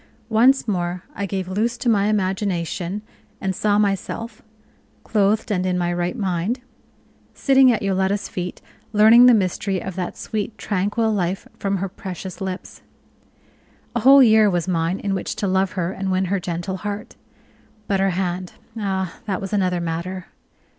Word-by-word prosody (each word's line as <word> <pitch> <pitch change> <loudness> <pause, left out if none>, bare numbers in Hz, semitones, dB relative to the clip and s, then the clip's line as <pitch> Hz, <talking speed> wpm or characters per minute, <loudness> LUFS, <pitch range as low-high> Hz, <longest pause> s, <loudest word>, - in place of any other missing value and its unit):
Once 245 +5 +4
more 180 -3 -2
I 200 - -3
gave 190 -2 -3
loose 220 +6 -1
to 245 - -4
my 205 -3 +3
imagination, 190 -1 -1 0.4
and 190 -2 -2
saw 205 +1 +2
myself 210 +3 -2 0.6
(clothed 210 0 +1
and 185 -3 +1
in 185 -1 0
my 175 -1 0
right 175 +6 -2
mind) 195 +3 -1 0.8
sitting 270 -2 +5
at 225 - -1
Yoletta's 195 +1 0
feet, 180 0 -5 0.3
learning 225 +4 +8
the 245 - +7
mystery 190 -1 0
of 190 +2 -6
that 180 -2 -4
sweet, 215 0 -4
tranquil 210 +3 0
life 190 -2 -1
from 195 0 0
her 195 +1 -2
precious 185 -1 -8
lips. 190 0 -6 1.1
A - - +2
whole 270 +4 +8
year 220 -2 +6
was 175 -2 -1
mine 170 +1 0
in 200 - -2
which 190 - -3
to - - -2
love 190 0 +1
her 180 -1 -1
and 195 0 -3
win 185 +1 +1
her 200 - +1
gentle 175 +2 -4
heart. 205 +1 -6 0.7
But 195 -1 +1
her 195 0 +3
hand 180 0 -2 0.3
ah, 190 -3 -2
that 190 -3 -1
was 195 +1 -6
another 185 -3 +1
matter. 170 +2 -4
195 Hz, 160 wpm, -22 LUFS, 180-210 Hz, 1.1 s, learning